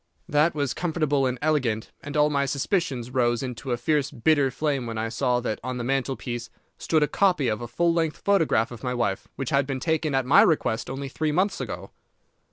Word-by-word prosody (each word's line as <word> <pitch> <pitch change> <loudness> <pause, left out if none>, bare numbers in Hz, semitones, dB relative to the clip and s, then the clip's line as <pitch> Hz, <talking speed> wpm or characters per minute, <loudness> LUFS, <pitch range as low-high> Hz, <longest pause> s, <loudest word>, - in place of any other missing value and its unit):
That 150 +3 +2
was 140 -3 -1
comfortable 155 -5 0
and 125 0 -2
elegant, 130 -8 0
and 145 +1 -5
all 150 0 +4
my 140 -1 +1
suspicions 135 - -1
rose 120 -1 +1
into 125 +1 -5
a 120 - +1
fierce 140 +3 +1
bitter 140 +3 +2
flame 140 -2 -1
when 115 -1 -4
I 110 +1 -1
saw 125 +1 +1
that 110 -3 -3
on 130 0 -3
the 120 - -3
mantelpiece 125 -2 -2 0.3
stood 155 -2 +2
a - - +2
copy 180 -9 +2
of 110 -1 -1
a 120 - -5
full 170 +9 +1
length 165 -2 0
photograph 160 - +2
of 120 -3 -9
my 125 0 -1
wife, 100 -5 -1
which 135 - -4
had 140 -1 +2
been 135 -2 -2
taken 155 0 0
at 135 -1 +1
my 145 +9 +7
request 155 - +1
only 135 +1 -4
three 155 +3 -1
months 185 +6 +1
ago. - - -6
135 Hz, 210 wpm, -25 LUFS, 120-155 Hz, 0.3 s, my